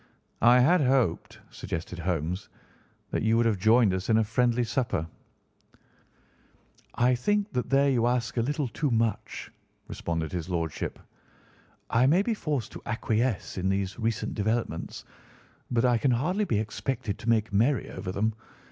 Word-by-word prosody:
"I 120 +2 +7
had 170 +6 +4
hoped," 130 - +1
suggested 85 +1 -5
Holmes, 85 +2 -2 0.6
"that - - -1
you 110 +1 +3
would 120 - +3
have 110 -4 +1
joined 110 0 +4
us 95 +3 -3
in 110 - +5
a 110 - +4
friendly 120 +2 +1
supper." 120 - -1 1.9
"I 125 +1 +3
think 205 - 0
that 125 - -2
there 140 +1 +4
you 120 -2 +2
ask 120 -2 0
a - - +3
little 145 +3 -1
too 145 +6 -2
much," 115 -2 -1 0.4
responded 80 -2 -3
his 90 -1 -4
Lordship. 85 -3 -3 0.9
"I 125 +3 +4
may 175 +7 +4
be 230 - 0
forced 145 - -3
to - - -9
acquiesce 115 -3 -1
in 95 +1 0
these 95 +2 -2
recent 110 -1 -1
developments, 110 +3 -2 0.6
but 120 0 +2
I 120 -2 +3
can 135 - +2
hardly 170 - +1
be 110 - 0
expected 110 +1 -3
to 115 - -3
make 110 -2 +2
merry 120 +4 +2
over 90 - -5
them. 110 +4 0
115 Hz, 155 wpm, -27 LUFS, 100-125 Hz, 1.9 s, I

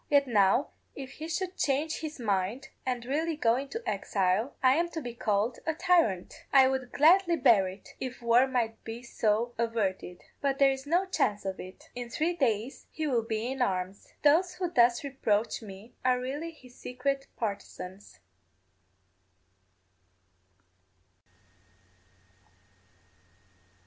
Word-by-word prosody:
Yet 285 -1 +5
now 215 +1 +3 0.3
if 270 -1 -7
he 310 +3 -7
should 360 +3 -3
change 295 +3 0
his 310 -2 -6
mind, 215 +4 -1 0.2
and 245 -2 -2
really 315 +5 -1
go 230 -5 +3
into 280 - -5
exile, 200 +3 0
I 260 0 +6
am 340 +4 +1
to 325 - -2
be 245 -5 -6
called 220 0 0
a 320 - -1
tyrant. 335 - +2 0.2
I 265 -1 +7
would 260 -2 -3
gladly 345 +3 +5
bear 230 - +4
it, 190 +1 -10
if 255 0 -5
war 235 +2 +4
might 235 -4 -2
be 230 +2 -7
so 235 0 0
averted. 200 -6 -2 0.2
But 275 -1 0
there 275 -1 +5
is 270 +1 -5
no 350 +5 +2
chance 210 - 0
of 190 -1 -3
it; 185 +1 -11
in 245 -1 -6
three 320 +8 0
days 245 -5 -1
he 315 - -4
will 250 -6 +2
be 225 +2 -3
in 265 -1 -4
arms. 190 -3 -2
Those 345 +5 +4
who 360 -2 -3
thus 240 -5 +4
reproach 230 -7 0
me 205 +1 -11
are 250 0 +3
really 280 +6 -4
his 255 -6 -16
secret 270 +3 -3
partisans. 200 - -6
250 Hz, 140 wpm, -29 LUFS, 220-290 Hz, 0.3 s, I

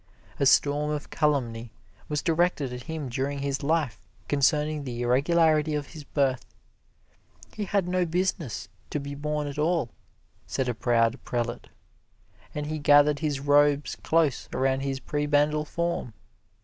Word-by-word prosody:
A 140 - +4
storm 145 +2 +3
of 150 -1 -4
calumny 120 -6 0 0.4
was 150 -1 -1
directed 165 -5 +1
at 125 0 -7
him 160 -3 -3
during 135 +3 -2
his 140 0 -2
life 150 -5 0 0.3
concerning 150 +1 +1
the 120 -2 -4
irregularity 155 +4 +3
of 145 -1 -3
his 155 -2 -9
birth. 135 -4 0 1.1
"He 210 - -3
had 195 -1 0
no 180 -1 +1
business 170 - -2 0.2
to 150 - -2
be 140 0 -6
born 150 +1 -2
at 145 0 -5
all," 155 -5 +1 0.6
said 130 - -1
a 125 - 0
proud 115 +1 +1
prelate, 120 0 -3 0.9
as 150 0 -2
he 155 +1 -3
gathered 145 0 +5
his 145 -3 -1
robes 145 0 +3
close 160 -5 +1
around 130 0 +1
his 135 -1 -2
prebendal 150 +2 +1
form. 170 -8 -3
145 Hz, 145 wpm, -27 LUFS, 135-155 Hz, 1.1 s, gathered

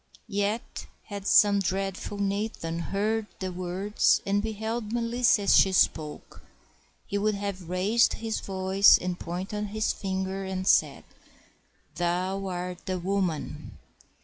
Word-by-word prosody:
Yet 205 +4 -2 0.2
had 200 -1 -5
some 205 -1 +5
dreadful 195 +1 -3
Nathan 200 -4 -2
heard 210 +4 -1
the 185 -1 -3
words, 185 +3 +1
and 200 +1 +1
beheld 220 +1 -4
Melissa 235 -2 +2
as 200 - +5
she 195 - +6
spoke, 155 -4 0 0.6
he 200 -1 -2
would 210 +1 +1
have 195 -4 -5
raised 200 +6 +3
his 225 -1 -3
voice 190 +1 +4
and 180 -1 -4
pointed 190 +5 -4
his 215 +2 -1
finger 190 0 -3
and 190 -1 -4
said, - - +3 0.9
"Thou 185 +3 -1
art 180 -1 -5
the 185 -1 -1
woman!" 180 -3 -3
195 Hz, 125 wpm, -27 LUFS, 185-210 Hz, 0.9 s, she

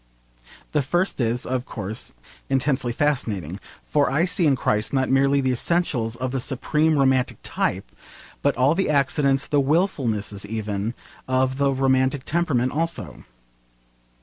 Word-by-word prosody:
The 150 - +2
first 175 +3 0
is, 120 +1 0
of 130 0 -2
course, 105 - -6 0.3
intensely 135 -2 +1
fascinating, 110 - -1 0.3
for 145 -2 +2
I 155 +5 +2
see 180 -2 +2
in 140 - +4
Christ 105 -2 0
not 130 -1 +1
merely 140 +1 +3
the 130 -1 +1
essentials 125 -5 0
of 130 +1 -3
the 135 - -1
supreme 150 +5 +1
romantic 130 -2 +2
type, - - -2 0.5
but 145 - +1
all 130 +4 +4
the 190 0 0
accidents, 140 -1 +2
the 145 -1 +2
wilfulnesses 135 - 0
even, 105 +1 -3 0.3
of 130 +1 +1
the 140 -1 +3
romantic 130 0 +1
temperament 145 -7 +1
also. 165 +2 -3
135 Hz, 140 wpm, -23 LUFS, 120-145 Hz, 0.5 s, in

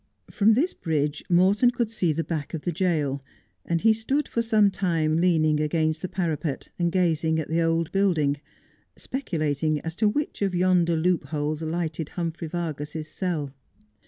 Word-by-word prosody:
From 215 +1 +4
this 320 +9 +1
bridge 150 -3 -1
Morton 190 +7 +4
could 235 -2 -1
see 180 -7 +1
the 165 +2 -1
back 160 -2 -4
of 155 - -5
the 175 - -2
jail, 155 -6 0 0.4
and 170 -1 -1
he 225 0 +5
stood 265 +7 -1
for 235 - -1
some 215 -3 +3
time 165 -5 0
leaning 160 -3 +3
against 155 +1 0
the - - -2
parapet, 165 -5 -2
and 170 -1 +1
gazing 160 -3 +1
at 155 - -4
the 165 +1 +1
old 165 0 +1
building, 165 -8 +2 0.6
speculating 155 - -1
as 165 - -5
to 215 -1 +3
which 290 +3 -3
of 195 -2 0
yonder 175 -2 +3
loopholes 155 -2 -1
lighted 160 -1 -3
Humphrey 165 -1 -4
Vargas's 155 -2 -4
cell. 155 -6 -3
165 Hz, 160 wpm, -25 LUFS, 155-185 Hz, 0.6 s, he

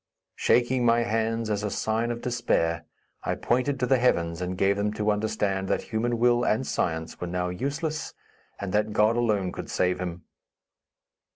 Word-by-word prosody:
Shaking 125 +1 +3
my 120 0 +4
hands 115 0 0
as 105 -1 0
a 105 - -1
sign 110 +3 -1
of 120 0 -4
despair, 85 -9 0 0.4
I - - -1
pointed 130 +3 0
to 125 - +2
the 130 0 +3
heavens 85 -8 +1
and 90 0 -3
gave 100 +1 +3
them 105 +1 0
to 105 0 +1
understand 105 -2 -1
that - - 0
human 120 +2 +1
will 120 +1 +3
and 115 +4 +1
science 80 -6 -2
were 90 - -2
now 90 +1 -1
useless, 145 - -3 0.4
and 100 -2 -4
that 105 0 +1
God 105 +2 +4
alone 105 -6 +1
could - - -7
save 90 0 +1
him. 90 -1 -5
110 Hz, 175 wpm, -26 LUFS, 95-120 Hz, 0.4 s, my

